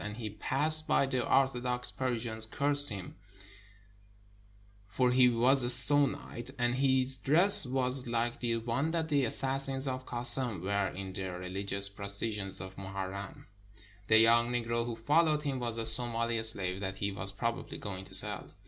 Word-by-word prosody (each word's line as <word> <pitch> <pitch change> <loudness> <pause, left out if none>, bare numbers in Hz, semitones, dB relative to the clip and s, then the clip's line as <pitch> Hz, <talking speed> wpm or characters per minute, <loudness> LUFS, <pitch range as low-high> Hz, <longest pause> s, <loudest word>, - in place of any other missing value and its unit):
As 105 +1 -7
he 110 -3 -7
passed 155 +8 -2
by, - - +1
the 130 -2 -3
Orthodox 125 -2 -1
Persians 115 -3 -3
cursed 145 +3 +4
him, 95 -4 -8 1.7
for 125 +6 -1
he 125 0 +4
was 125 +3 +2
a 120 - 0
Sunnite, 130 -1 +2
and 120 -1 -1
his 130 0 +1
dress 165 +4 +2
was 130 0 -3
like 120 0 -2
the 120 -2 -2
one 120 +7 -3
that 160 -1 -3
the 140 -3 0
assassins 135 +2 -1
of 130 0 -6
Kassem 120 -5 +1
wear 100 0 -1
in 95 +1 -8
the 95 0 -6
religious 95 +2 -1
procession 100 +1 -2
of 95 +1 -10
Mohar 95 -1 -6
rem. 100 0 -10 0.6
The 110 - +4
young 115 +1 +3
Negro 115 -1 -3
who 120 - -5
followed 150 +6 0
him 140 -3 -4
was 120 -2 -5
a 115 - -4
Somali 115 -1 +5
slave 95 -4 +3
that 95 -1 -5
he 100 +1 -3
was 100 0 -4
probably 115 +4 -5
going 95 -2 -6
to - - +5
sell. - - +2
120 Hz, 165 wpm, -29 LUFS, 100-130 Hz, 1.7 s, Somali